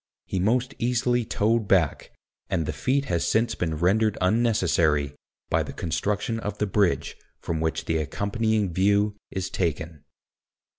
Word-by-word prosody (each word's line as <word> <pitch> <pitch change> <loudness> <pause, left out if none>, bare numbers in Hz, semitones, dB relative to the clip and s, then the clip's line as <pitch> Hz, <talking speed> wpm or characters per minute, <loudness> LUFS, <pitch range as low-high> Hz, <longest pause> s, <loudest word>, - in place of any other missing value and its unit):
He 95 - -2
most 125 +7 +1
easily 120 0 +1
towed 110 0 +1
back, 85 -8 +2 0.4
and 90 -5 0
the - - -3
feat 135 +2 0
has 85 -9 0
since 115 +1 +2
been 80 -3 -2
rendered 105 +6 +2
unnecessary 90 - +2 0.4
by - - +3
the - - -5
construction 105 +7 -2
of 105 -2 -4
the 105 - 0
bridge 100 -2 +1 0.2
from 80 -1 -3
which 80 -1 -1
the 80 - 0
accompanying 100 - -1
view 100 +3 +2
is 95 -1 -4
taken. 80 -3 -2
100 Hz, 145 wpm, -25 LUFS, 85-110 Hz, 0.4 s, by